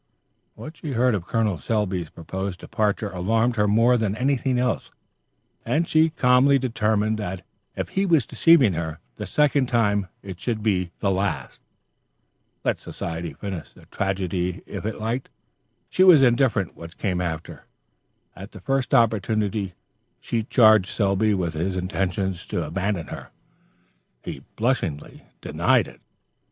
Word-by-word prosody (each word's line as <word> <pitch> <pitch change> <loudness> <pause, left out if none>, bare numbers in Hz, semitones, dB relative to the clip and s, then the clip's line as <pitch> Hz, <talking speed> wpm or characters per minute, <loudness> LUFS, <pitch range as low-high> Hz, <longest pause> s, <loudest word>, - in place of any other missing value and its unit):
What 155 +1 -10
she 150 -4 -5
heard 125 +1 +3
of 95 -4 -3
Col. 105 -6 0
Selby's 95 -7 -1
proposed 95 +2 -5
departure 105 -2 -1
alarmed 110 +6 +1
her 105 0 +3
more 115 +4 +4
than 110 -3 -1
anything 130 0 +1
else, 125 -1 -1 0.7
and 165 +2 0
she 160 +1 +4
calmly 135 -1 +4
determined 110 -4 0
that 95 -3 -5 0.3
if - - -3
he 195 +1 0
was 160 -9 +3
deceiving 150 - +4
her 80 -1 -4 0.2
the - - -5
second 145 -3 +2
time 105 -5 +1 0.2
it 95 -3 -8
should 110 0 -2
be 90 -5 +1
the 100 - +2
last. 95 +2 -2 1.0
Let - - 0
society 85 -2 -5
finish 90 -7 -6
the - - -19
tragedy 95 -2 -2
if - - -5
it 110 - -4
liked; 115 +4 -3 0.6
she 185 - +2
was 170 -7 +8
indifferent 120 -6 +2
what 85 0 -11
came 90 -4 -1
after. 85 -2 -5 0.7
At 95 +4 -10
the 100 - -10
first 135 +6 0
opportunity, 105 -4 +1 0.4
she 115 - -2
charged 110 -4 +5
Selby 100 0 +1
with 85 -3 -2
his 90 +4 -2
intention 95 +1 -1
to 85 -1 -4
abandon 90 +2 -2
her. - - -8 0.9
He - - -5
unblushingly 95 - -3
denied - - +2
it. - - -15
105 Hz, 145 wpm, -24 LUFS, 95-120 Hz, 1.0 s, was